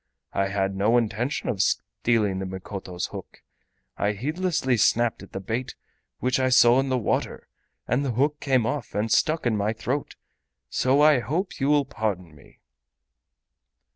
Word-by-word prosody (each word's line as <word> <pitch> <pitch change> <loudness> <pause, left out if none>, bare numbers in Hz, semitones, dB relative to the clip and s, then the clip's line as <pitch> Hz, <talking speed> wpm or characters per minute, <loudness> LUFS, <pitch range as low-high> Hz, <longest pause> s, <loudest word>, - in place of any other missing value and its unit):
I 100 - +1
had 95 0 -1
no 105 +5 +3
intention 120 +3 -1
of 100 -5 0
stealing 105 -2 0
the 95 - -4
Mikoto's 95 -1 -5
hook. - - -10 0.5
I 105 +1 0
heedlessly 150 - 0
snapped 120 +1 +2
at 100 - -12
the - - -5
bait 115 +6 -4 0.4
which 130 +1 0
I 130 0 +2
saw 125 0 +6
in 135 0 0
the 130 - +1
water, 120 - -2 0.4
and 125 +4 +1
the 130 -4 -1
hook 145 +5 +1
came 130 -5 +1
off 145 -1 -3
and 105 +2 -1
stuck 155 +4 +2
in 115 -2 +2
my 105 +1 0
throat. 130 +5 -3 0.6
So 135 +3 +2
I 150 -3 +6
hope 155 - -3
you 135 - +1
will 145 -1 +3
pardon 100 - -3
me." 70 - -20
120 Hz, 165 wpm, -25 LUFS, 100-135 Hz, 0.6 s, saw